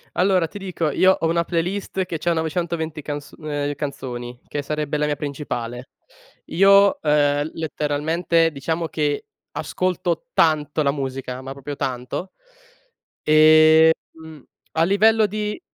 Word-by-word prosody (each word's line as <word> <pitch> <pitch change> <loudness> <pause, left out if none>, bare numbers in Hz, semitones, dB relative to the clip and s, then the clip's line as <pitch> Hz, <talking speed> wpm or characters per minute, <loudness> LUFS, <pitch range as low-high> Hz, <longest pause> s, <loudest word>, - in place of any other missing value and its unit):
Allora 185 -2 +2
ti 205 - -9
dico, 180 -5 -2
io 185 +6 +4
ho 165 - 0
una 170 +1 +1
playlist 185 +3 -2
che 170 -3 -5
c'ha 170 +1 +1
920 160 -1 -2
canz 145 0 -6
ehm, 145 -2 -3
canzoni, 125 -4 -6
che 145 - -3
sarebbe 150 +1 -2
la 150 - 0
mia 150 - 0
principale. 130 -4 -5 0.6
Io, 200 +2 +5
ehm, 145 0 +2
letteralmente, 160 +2 0
diciamo 160 +3 -3
che 150 -2 -1 0.3
ascolto 185 +3 -2
tanto 155 -1 +2
la 140 - +2
musica, 130 -2 -5
ma 135 +1 -7
proprio 140 +1 -7
tanto. 130 +8 -4 0.9
Ehm, 155 +1 +6 0.8
a 160 - +2
livello 215 +4 +4
di 210 +3 -3
155 Hz, 130 wpm, -22 LUFS, 145-170 Hz, 0.9 s, Ehm